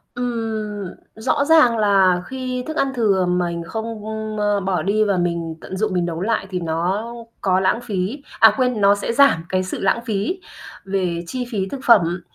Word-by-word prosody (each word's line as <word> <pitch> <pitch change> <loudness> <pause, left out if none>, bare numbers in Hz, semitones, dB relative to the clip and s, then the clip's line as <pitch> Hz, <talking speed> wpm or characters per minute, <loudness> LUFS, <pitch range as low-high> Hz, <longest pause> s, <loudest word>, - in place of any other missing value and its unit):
Ừm, 220 -5 -3 0.3
rõ 220 +6 0
ràng 305 -8 +5
là 195 -4 +3
khi 255 -1 -4
thức 315 - -4
ăn 270 -1 +1
thừa 200 -6 +2
mình 175 -1 -1
không, 220 +4 -4 0.5
ơ, 205 -1 +1
bỏ 185 -3 -1
đi 205 +5 +1
và 200 -3 +1
mình 170 -2 -2
tận 190 - -7
dụng 210 -1 -1
mình 180 -1 +1
nấu 170 0 -4
lại 220 -1 -1
thì 185 -2 -3
nó 175 +6 -1 0.4
có 185 -1 +2
lãng 190 +5 +1
phí 210 +5 -3 0.2
à, - - +7
quên, 250 -5 +1
nó 200 +1 +5
sẽ 200 - -3
giảm 275 -11 +4
cái 185 0 0
sự 185 - -5
lãng 195 +4 +1
phí 220 - -2 0.5
về 180 -3 -1
chi 250 +5 -3
phí 195 -3 -1
thực 275 - -5
phẩm, 180 -6 +4
200 Hz, 190 wpm, -21 LUFS, 180-230 Hz, 0.5 s, à